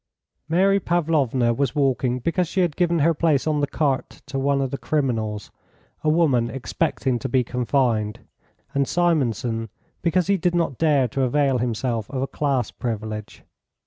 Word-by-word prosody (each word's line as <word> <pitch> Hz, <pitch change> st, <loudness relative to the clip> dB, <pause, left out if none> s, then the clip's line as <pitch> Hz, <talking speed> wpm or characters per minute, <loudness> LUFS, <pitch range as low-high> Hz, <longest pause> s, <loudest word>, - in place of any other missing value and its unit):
Mary 195 Hz, +4 st, +3 dB
Pavlovna 150 Hz, -9 st, +1 dB
was 130 Hz, 0 st, -1 dB
walking 130 Hz, -3 st, +1 dB
because 170 Hz, +7 st, 0 dB
she 190 Hz, -, 0 dB
had 170 Hz, -5 st, 0 dB
given 175 Hz, -1 st, +2 dB
her 165 Hz, +2 st, +3 dB
place 155 Hz, -3 st, +1 dB
on 155 Hz, -2 st, +1 dB
the 145 Hz, -, +1 dB
cart 140 Hz, -2 st, -2 dB
to 140 Hz, -1 st, -4 dB
one 140 Hz, +1 st, +1 dB
of 135 Hz, -2 st, -1 dB
the 140 Hz, -, -2 dB
criminals, 115 Hz, -8 st, -2 dB, 0.5 s
a 155 Hz, -, +2 dB
woman 140 Hz, -8 st, +3 dB
expecting 135 Hz, -1 st, -1 dB
to 135 Hz, -, -4 dB
be 130 Hz, 0 st, +2 dB
confined, 120 Hz, -3 st, 0 dB, 0.5 s
and 140 Hz, -1 st, +1 dB
Simonson 125 Hz, -, 0 dB, 0.3 s
because 175 Hz, +1 st, +2 dB
he 200 Hz, 0 st, +2 dB
did 175 Hz, 0 st, 0 dB
not 165 Hz, -7 st, 0 dB
dare 145 Hz, -5 st, +3 dB
to 135 Hz, -, -2 dB
avail 135 Hz, 0 st, +2 dB
himself 115 Hz, -2 st, -2 dB
of 130 Hz, -1 st, -2 dB
a -, -, -2 dB
class 135 Hz, -6 st, -1 dB
privilege. 110 Hz, -3 st, -5 dB
135 Hz, 165 wpm, -23 LUFS, 120-160 Hz, 0.5 s, Mary